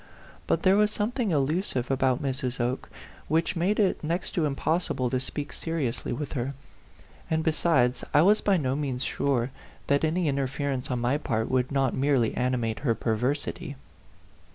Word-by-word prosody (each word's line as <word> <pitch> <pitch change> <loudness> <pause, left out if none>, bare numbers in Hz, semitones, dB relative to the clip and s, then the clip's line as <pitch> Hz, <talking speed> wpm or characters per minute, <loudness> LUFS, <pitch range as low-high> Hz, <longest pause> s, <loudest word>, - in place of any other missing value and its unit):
But - - +1
there 190 +1 +5
was 210 0 +4
something 220 +2 -1
elusive 145 -3 0
about 130 0 +1
Mrs. 130 -2 -2
Oke, 120 +2 -1 0.4
which 165 +4 +1
made 180 +5 +1
it 195 -5 +2
next 170 +4 -2
to 165 - +1
impossible 140 -3 0
to 130 - +1
speak 130 +1 -5
seriously 155 -8 -3
with 140 +3 -4
her; 135 0 -2 0.7
and, 160 0 +1
besides, 150 -6 +2
I 150 - +5
was 210 +4 +5
by 200 -2 +3
no 135 -4 0
means 135 -4 -2
sure 130 -3 0 0.3
that 140 +1 +2
any 165 +2 +1
interference 140 -1 -1
on 125 - 0
my 125 +5 +1
part 110 -5 -1
would 130 0 +1
not 135 -2 +1
merely 130 -4 +2
animate 120 -3 -1
her 120 -5 +1
perversity. 140 +8 -2
140 Hz, 160 wpm, -27 LUFS, 125-160 Hz, 0.7 s, there